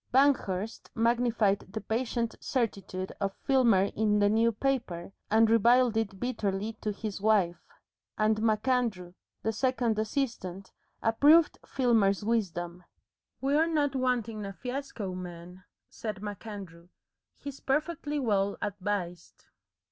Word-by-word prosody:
Banghurst 230 -7 +1
magnified 230 -3 +2
the 220 - -3
patient 230 +1 -1
certitude 195 -6 -2
of 195 0 -1
Filmer 240 -8 +4
in 210 -1 +2
the 205 0 +4
New 225 +2 +3
Paper, 220 -8 -2 0.2
and 225 +1 +5
reviled 235 +2 +4
it 200 -4 -1
bitterly 215 -3 -2
to 215 - -1
his 205 -1 -5
wife, 200 -5 +2 0.6
and 215 0 +2
MacAndrew, 220 -5 0 0.3
the 220 - +1
second 235 -2 0
assistant, 215 -6 -3 0.3
approved 295 +8 +5
Filmer's 215 -6 +2
wisdom. 180 -6 -1 0.6
"We're 290 +4 +3
not 295 -4 +1
wanting 240 -4 0
a 195 0 -5
fiasco, 250 -5 -5
man," 180 0 -9 0.2
said 210 -3 -6
MacAndrew. 200 -5 -8 0.5
"He's 280 -1 -8
perfectly 295 +1 -1
well 200 -5 +1
advised." 195 -4 -4
220 Hz, 115 wpm, -29 LUFS, 195-250 Hz, 0.6 s, and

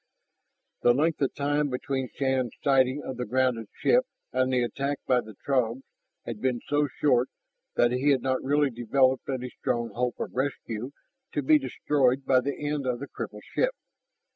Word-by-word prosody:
The 120 0 +5
length 155 +3 +1
of 135 - +1
time 145 +1 +1
between 130 0 -2
Shann's 130 -3 0
sighting 135 0 +3
of 130 - -5
the 125 - -2
grounded 125 -2 +1
ship 255 +1 +2 0.3
and 130 0 +2
the 125 -1 +2
attack 140 +4 -2
by 125 -1 +3
the 110 -3 -12
Throgs 130 -2 +1 0.4
had 110 -3 -6
been 125 -2 +1
so 145 0 +2
short 130 -3 +2 0.5
that 120 0 +4
he 130 +4 +2
had 135 -4 +3
not 130 -1 0
really 145 0 +2
developed 130 +3 +2
any 125 -2 -3
strong 120 -1 -2
hope 125 +2 -1
of - - -4
rescue 125 -3 -3 0.4
to 145 - -1
be 150 +3 +6
destroyed 135 0 +1
by 130 -1 +5
the 140 +2 -3
end 145 -3 -1
of 125 -1 0
the 140 - -6
crippled - - -7
ship. - - 0
130 Hz, 175 wpm, -27 LUFS, 125-140 Hz, 0.5 s, be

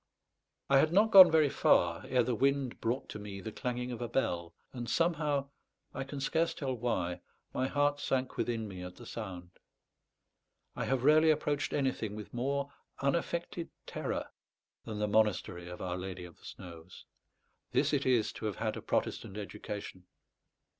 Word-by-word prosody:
I 135 -1 +5
had 155 +3 +3
not 210 +5 +4
gone 190 -4 +11
very 155 -2 +5
far 85 -1 +3
ere 125 -1 +3
the 125 - 0
wind 135 +1 +1
brought 120 +4 -1
to 105 - -6
me 100 -1 -7
the 110 +3 -6
clanging 125 +2 -3
of 120 - -6
a 120 - -2
bell, 85 -9 -1 0.2
and 120 -2 -5
somehow, 150 -5 +1 0.4
I 135 - -4
can 140 +1 -6
scarce 160 +4 +1
tell 135 -3 -2
why, 90 -8 -2 0.3
my 130 - 0
heart 145 +1 +1
sank 130 -2 -1
within 115 -2 -1
me 95 -3 -8
at 90 0 -8
the 120 - -12
sound. 90 -7 -7 1.2
I - - -2
have 130 -2 0
rarely 155 +3 +6
approached 150 -1 +1
anything 130 -7 -1
with 105 -1 -9
more 140 +3 -1 0.3
unaffected 170 +3 -1 0.2
terror - - -4 0.5
than 110 -2 -5
the 105 0 0
monastery 100 -5 +1
of 90 - -7
Our 90 -1 -2
Lady 90 -1 -6
of 85 - -13
the - - -18
Snows. 85 -1 -11 0.7
This - - +2
it - - +2
is 120 -4 +3
to - - -7
have 105 - -3
had 110 -1 -2
a - - -6
Protestant 95 - -2
education. 100 -2 -7
120 Hz, 170 wpm, -32 LUFS, 100-140 Hz, 1.2 s, gone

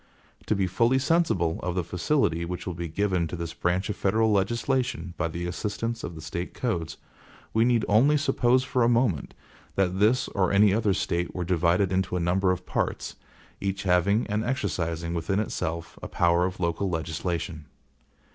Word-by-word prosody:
To 110 - +2
be 95 -1 +1
fully 115 +8 +2
sensible 130 - +1
of 90 -1 -2
the 90 - 0
facility 90 - 0
which 90 +1 -5
will 90 - -3
be 85 0 -4
given 90 0 0
to 80 - -5
this 85 -1 -5
branch 90 +2 0
of 105 - -3
federal 110 +3 +2
legislation 115 -2 0
by 85 - -1
the 85 +2 -5
assistance 105 +6 -3
of 85 - -5
the 80 - -9
State 85 +3 -5
codes, 85 -10 -2 0.6
we 110 +1 +4
need 120 -3 +2
only 130 +9 +4
suppose 130 -3 +2
for 130 -1 -1
a 115 - +4
moment 115 - +1 0.4
that 95 -1 +1
this 115 +5 +3
or 95 -2 +1
any 100 0 +5
other 105 -3 +2
State 85 +1 -2
were 90 -1 -2
divided 90 +2 +2
into 95 -1 0
a - - 0
number 90 +3 +1
of 90 -1 -1
parts, - - -2 0.4
each 95 -1 -2
having 95 +4 +2
and 105 0 -1
exercising 85 - -2
within 85 +4 -1
itself 85 -5 -3
a - - -5
power 85 0 +2
of 95 - -7
local 85 +3 0
legislation. 80 -1 -3
95 Hz, 180 wpm, -26 LUFS, 85-110 Hz, 0.6 s, any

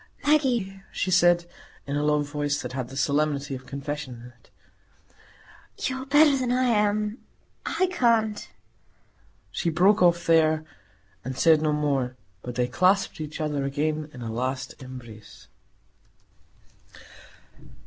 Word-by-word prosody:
"Maggie," 245 -10 +1
she 185 - -2
said, 175 -1 +4 0.4
in 140 - -3
a 145 - 0
low 150 0 +2
voice, 145 0 -2
that - - -6
had 130 -2 -3
the 135 - -8
solemnity 145 0 0
of 130 0 -8
confession 140 -2 -5
in 120 +1 -12
it, - - -27 1.4
"you 260 - -2
are 265 - -9
better 290 +1 +5
than 255 -2 -1
I 255 +1 +2
am. 210 -1 +1 0.5
I 350 +3 +1
can't——" 230 - +1 1.0
She 170 - -1
broke 185 +6 +3
off 175 -1 +4
there, 155 -1 +3 0.6
and 130 +1 -5
said 160 +2 +5
no 155 -1 +1
more. 140 -4 0 0.3
But 125 +1 -7
they 125 0 +1
clasped 185 +5 +1
each 155 0 -6
other 150 -3 -1
again 150 +2 -2
in 125 -4 -9
a 115 - -4
last 130 +3 -3
embrace. 120 -5 -11
155 Hz, 140 wpm, -25 LUFS, 135-205 Hz, 1.4 s, better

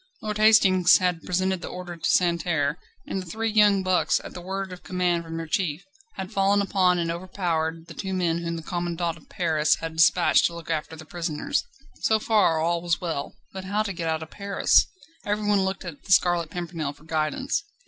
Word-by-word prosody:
Lord 210 -1 -3
Hastings 190 -5 +6
had 180 -3 0
presented 185 0 -1
the - - -6
order 180 -1 -7
to 165 - -2
Santerre, 170 -3 +1 0.3
and 190 - -3
the - - -9
three 225 +5 -2
young 205 -2 +4
bucks, 185 -1 +2
at - - -9
the 180 - -8
word 190 +1 -4
of 180 - -11
command 180 -2 0
from 165 0 -7
their 165 - -4
chief, 155 0 -2 0.3
had 190 +1 -6
fallen 200 0 +2
upon 185 -2 +2
and 165 -1 -1
overpowered 165 -2 -2
the 165 - -11
two 190 +3 -5
men 175 -3 0
whom 170 0 -3
the 165 - -6
commandant 175 -1 -2
of 160 - -19
Paris 155 -4 +2
had 165 -1 -6
despatched 170 +2 +5
to 170 - -1
look 170 0 -6
after 160 0 -3
the 155 0 -11
prisoners. 170 - -2 0.4
So 220 - +3
far 210 -7 +2
all 170 +1 0
was 170 -2 0
well. 160 -5 -4 0.2
But 190 0 -7
how 205 +3 0
to 200 -2 -4
get 170 -2 -3
out 160 0 -1
of 160 - -12
Paris? 200 -1 +3 0.4
Everyone 205 -1 +1
looked 190 0 -2
to 180 - -5
the 195 - -8
Scarlet 175 -3 +3
Pimpernel 165 -4 -4
for 150 - -21
guidance. 160 - -1
175 Hz, 205 wpm, -25 LUFS, 165-190 Hz, 0.4 s, Hastings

